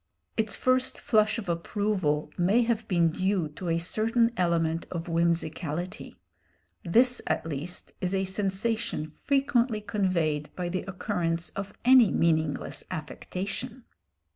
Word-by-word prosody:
Its 220 -1 0
first 255 0 +1
flush 215 -1 +2
of 220 -4 -5
approval 170 -3 -1
may 195 +7 +3
have 225 -2 -1
been 170 -3 +3
due 185 -1 0
to 170 +4 -6
a 165 - +2
certain 225 +7 +2
element 170 -3 +1
of 170 -2 -4
whimsicality. 170 0 -1 0.7
This 245 +8 +4
at - - 0
least 160 +3 -5
is 185 +1 0
a 190 - +1
sensation 195 -3 -1
frequently 250 - +1
conveyed 175 -8 0
by 180 -1 -3
the 185 +1 -2
occurrence 175 -3 -2
of 195 0 -6
any 250 -4 +7
meaningless 160 -4 0
affectation. 195 +7 -5
185 Hz, 125 wpm, -28 LUFS, 165-220 Hz, 0.7 s, any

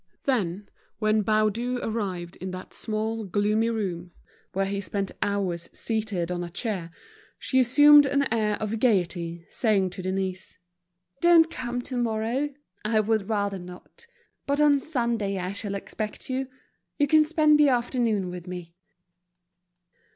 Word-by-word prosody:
Then, 205 -7 -1 0.3
when 215 0 +2
Baudu 215 +4 +1
arrived 190 -6 -3
in 185 - -5
that 185 0 -8
small, 220 +1 -3
gloomy 210 +3 +1
room, 180 -6 -3 0.4
where 195 +1 0
he 200 0 -2
spent 200 0 -3
hours 185 -4 -1
seated 215 -6 -2
on 175 0 -2
a 175 - -6
chair, 185 -3 -3 0.5
she 260 - +1
assumed 290 +3 +7
an 280 +1 +2
air 215 -2 +1
of 215 +1 -3
gaiety, 175 -7 0
saying 200 -5 +1
to 185 - -6
Denise—"Don't 185 - 0
come 245 0 -4
tomorrow, 240 +2 -1 0.3
I 215 0 +2
would 215 -1 0
rather 200 -3 -1
not. 180 - -12 0.4
But 280 +1 +1
on 290 -2 +5
Sunday 235 -9 -1
I 180 0 -3
shall 200 0 -5
expect 215 +4 -5
you; 260 +1 -1 0.5
you 290 - +4
can 310 +2 +5
spend 305 -1 +4
the 295 -1 +6
afternoon 235 -6 0
with 180 0 -8
me." 175 -2 -7
215 Hz, 135 wpm, -26 LUFS, 185-245 Hz, 0.5 s, assumed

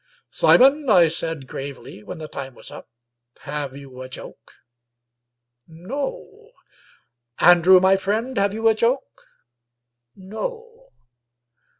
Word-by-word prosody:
"Simon," 275 - +4
I 175 -6 +6
said 160 -3 -4
gravely, 135 -5 -8
when 105 - -9
the 155 -1 -8
time 135 -3 -8
was - - -10
up, - - -11 0.3
" 120 0 -60
have 145 -2 -5
you 135 -2 -11
a 130 - -8
joke? - - -11 1.2
No. 290 - -7 0.8
Andrew, 175 +1 +6
my 190 +1 +4
friend, 220 +7 -2
have 200 -1 +1
you 225 +2 -1
a 225 - +5
joke? 240 +5 -1 0.9
No. 460 - -8
190 Hz, 115 wpm, -22 LUFS, -, 1.2 s, I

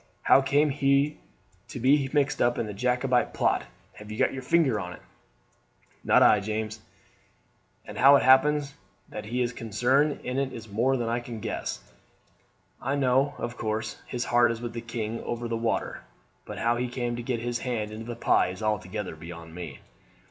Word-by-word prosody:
How 135 - +6
came 145 +2 +2
he 140 +1 +2 0.5
to - - -7
be 135 +2 +3
mixed 145 -2 +1
up 120 0 +2
in 110 - -2
a 105 - -5
Jacobite 125 +3 +1
plot? - - +1 0.3
Have 105 0 -11
you 105 - -6
got - - +2
your 135 - -5
finger 135 -4 +2
in 90 -2 -5
it?" - - -13 1.0
"Not - - +5
I, 105 - +6
James; 110 +1 -4 1.0
and - - -8
how 140 +2 +8
it - - +3
happens 140 +2 +4 0.4
that 105 0 -7
he 125 +3 -1
is 120 0 -2
concerned 125 +7 +1
in 125 +2 -2
it 135 -1 -2
is 110 -2 -8
more 120 +6 +1
than 120 -2 -2
I 120 +1 0
can 120 -2 -7
guess. - - -4 1.0
I 135 +3 -1
know, 135 +1 +2
of 120 0 -4
course, 110 0 -3
his 120 -1 -3
heart 120 -1 +4
is 115 - -4
with 120 -1 -5
the 115 - -5
king 115 -1 -4
over 120 0 -4
the 115 - -2
water; 115 0 -2 0.4
but - - -7
how 120 +1 +1
he 125 +1 -1
came 120 -1 -3
to 120 - -5
get 120 0 -2
his 120 +1 -2
hand 110 -4 -3
into 110 +1 -7
the 120 - -4
pie 115 - +3
is 95 +3 -7
altogether 105 -3 -2
beyond 85 0 -10
me." 90 0 -8
120 Hz, 190 wpm, -27 LUFS, 110-135 Hz, 1.0 s, how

